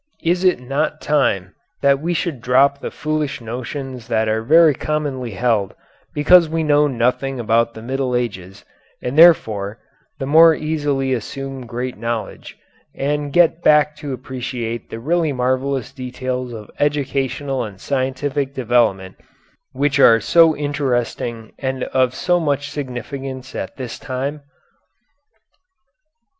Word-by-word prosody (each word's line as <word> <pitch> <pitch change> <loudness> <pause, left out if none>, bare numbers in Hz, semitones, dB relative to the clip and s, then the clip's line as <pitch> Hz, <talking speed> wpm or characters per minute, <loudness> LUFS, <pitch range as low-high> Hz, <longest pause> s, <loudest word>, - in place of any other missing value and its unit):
Is 175 +2 +1
it 185 -7 +3
not 135 +5 -2
time 120 -11 0 0.3
that 140 -1 +4
we 170 +4 -2
should 155 -7 -2
drop 135 +3 +3
the - - -5
foolish 150 -2 -3
notions 125 +1 -6
that 110 -2 +1
are 110 +1 0
very 155 +5 +5
commonly 140 -4 -3
held 110 -2 0 0.4
because 165 +3 +5
we 160 0 -1
know 150 -1 +4
nothing 130 +1 -1
about 115 0 +1
the 110 - -9
Middle 130 0 -2
Ages 100 -5 -4 0.4
and, 125 +2 -3
therefore, 110 - +4 0.4
the 135 - -4
more 160 +3 +6
easily 145 -4 -1
assume 135 +2 -5
great 125 0 -5
knowledge 115 -1 -5 0.4
and 145 +1 -2
get 170 +1 +3
back 150 -1 +4
to 145 -2 -6
appreciate 125 -3 -5
the 115 - -6
really 160 +4 0
marvellous 130 +1 -1
details 130 -1 -4
of 110 -3 -9
educational 140 -2 -1
and 100 -4 -8
scientific 135 +2 -2
development 115 -7 +1 0.5
which 140 +1 0
are 115 -4 +7
so 165 +4 +4
interesting 125 -5 -2
and 130 -1 -2
of 130 -1 +1
so 175 +5 +1
much 145 -3 -1
significance 130 0 -6
at - - -6
this 125 -3 -6
time? 140 +2 -4
135 Hz, 130 wpm, -19 LUFS, 120-145 Hz, 0.5 s, are